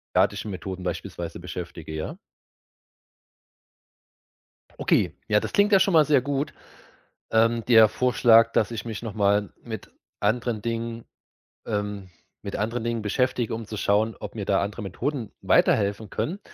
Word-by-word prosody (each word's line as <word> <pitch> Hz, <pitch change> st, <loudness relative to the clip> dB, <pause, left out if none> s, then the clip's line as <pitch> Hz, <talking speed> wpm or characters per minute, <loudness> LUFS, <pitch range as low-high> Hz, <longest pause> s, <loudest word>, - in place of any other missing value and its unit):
derartige -, -, +2 dB
Methoden 95 Hz, -1 st, -6 dB
beispielsweise 85 Hz, -1 st, -5 dB
beschäftige, 85 Hz, -2 st, -7 dB
ja? 80 Hz, -, -5 dB, 2.6 s
Okay, -, -, +2 dB
ja, -, -, +4 dB
das -, -, -6 dB
klingt 205 Hz, +1 st, +4 dB
ja 195 Hz, -, +7 dB
schon 190 Hz, 0 st, +2 dB
mal 160 Hz, -2 st, +7 dB
sehr 145 Hz, -4 st, +4 dB
gut. 140 Hz, +2 st, -2 dB, 0.8 s
Ähm, 115 Hz, +1 st, +3 dB
der 110 Hz, -3 st, +7 dB
Vorschlag, 115 Hz, -1 st, +4 dB
dass 110 Hz, -, +2 dB
ich 115 Hz, 0 st, -5 dB
mich 110 Hz, -2 st, -5 dB
noch 115 Hz, -3 st, -5 dB
mal 100 Hz, 0 st, +2 dB
mit 110 Hz, -3 st, -8 dB, 0.3 s
anderen 110 Hz, +1 st, 0 dB
Dingen 115 Hz, 0 st, -4 dB, 0.6 s
ähm, 105 Hz, -3 st, -3 dB, 0.3 s
mit 100 Hz, -, -5 dB
anderen 115 Hz, +2 st, -2 dB
Dingen 115 Hz, -1 st, -1 dB
beschäftige, 120 Hz, +2 st, 0 dB
um 115 Hz, 0 st, -4 dB
zu 110 Hz, -, -7 dB
schauen, 105 Hz, +2 st, +1 dB
ob -, -, -7 dB
mir 105 Hz, -3 st, -5 dB
da 95 Hz, 0 st, +2 dB
andere 100 Hz, +3 st, -4 dB
Methoden 115 Hz, +4 st, -3 dB
weiterhelfen 100 Hz, 0 st, +2 dB
können. 185 Hz, +6 st, -3 dB
110 Hz, 145 wpm, -25 LUFS, 100-120 Hz, 2.6 s, ja